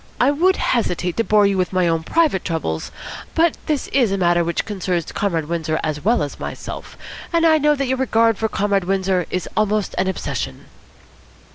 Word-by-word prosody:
I 260 +3 +4
would 360 +6 +3
hesitate 180 -7 0
to 230 - +2
bore 210 -2 +4
you 200 -1 +1
with 180 - 0
my 185 -1 +2
own 165 -1 +1
private 305 - +1
troubles, 150 - -3 0.4
but 330 0 +3
this 300 -3 -1
is 245 -7 +2
a 195 - 0
matter 175 -2 +3
which 170 0 -2
concerns 185 -5 -2
Comrade 170 -6 -1
Windsor 160 -2 -1
as 150 -2 -3
well 220 -4 +2
as 145 - -6
myself, - - -7 0.3
and 335 -1 +3
I 315 -1 +5
know 300 0 +3
that 275 -1 -1
your 260 0 -1
regard 230 -4 +2
for 220 - 0
Comrade 200 -2 0
Windsor 190 -1 0
is 185 - -3
almost 215 -1 0
an 185 - +1
obsession." 190 - -4
195 Hz, 190 wpm, -20 LUFS, 175-245 Hz, 0.4 s, I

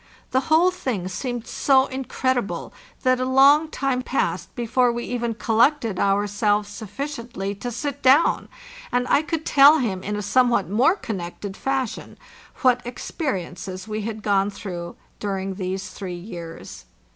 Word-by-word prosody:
The 260 - +3
whole 335 +4 +5
thing 240 - -3
seemed 240 +5 -4
so 265 -1 +3
incredible 260 -3 -2 0.3
that 255 -1 +3
a - - 0
long 275 +4 +6
time 270 -4 -1
passed 185 -9 -2
before 240 +1 +2
we 235 0 -4
even 235 -2 -2
collected 230 -1 +2
our 200 +1 +2
selves 205 0 +1
sufficiently 230 -2 -5
to 245 - -3
sit 285 +4 -4
down, 270 +5 +4 0.4
and 250 0 +1
I - - +4
could 315 0 -3
tell 285 +3 +7
him 195 -9 -2
ina 210 +1 -3
somewhat 240 -1 +3
more 240 - +3
connected 195 - -6
fashion 265 -2 -3 0.5
what 250 -1 +4
experiences 190 - -5
we 215 0 -3
had 215 0 -5
gone 200 -1 +2
through 175 -4 -7 0.2
during 195 -1 -3
these 190 +1 -4
three 185 -3 -6
years. 170 -3 -9
230 Hz, 145 wpm, -23 LUFS, 195-260 Hz, 0.5 s, tell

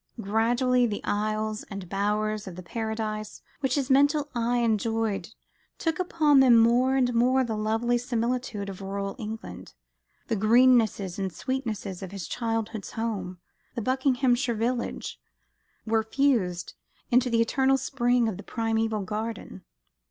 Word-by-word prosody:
Gradually 240 +4 +2
the 205 -2 -4
aisles 215 +1 -1
and 195 -3 -7
bowers 210 +2 -1
of 180 - -7
the 185 - -8
Paradise 220 +1 -4 0.2
which 270 -3 0
his 275 -2 -1
mental 285 +2 +3
eyes 240 0 +1
enjoyed 220 -3 0 0.5
took 325 0 -1
upon 310 -6 +3
them 250 -3 +7
more 240 +3 +4
and 250 -2 +2
more 255 +3 +3
the 225 -3 -2
lovely 225 +3 0
similitude 240 -3 -2
of 195 -1 -7
rural 195 0 -4
England. 220 0 -7 0.5
The 230 - 0
greennesses 220 -4 +3
and 190 -1 -2
sweetnesses 220 -6 -4
of 190 -1 -7
his 195 -4 -6
childhood's 225 -3 -3
home, 200 -5 -3 0.4
the 235 - -3
Buckinghamshire 255 -1 +1
village, 235 +2 -2 0.7
were 225 0 +2
fused 220 -8 0 0.4
into 250 +1 +4
the 230 -1 +2
"eternal 265 +3 +2
spring" 245 -2 +1
of 210 -5 -3
the - - -7
primeval 225 -2 -1
garden. 210 - -5
225 Hz, 135 wpm, -27 LUFS, 210-250 Hz, 0.7 s, them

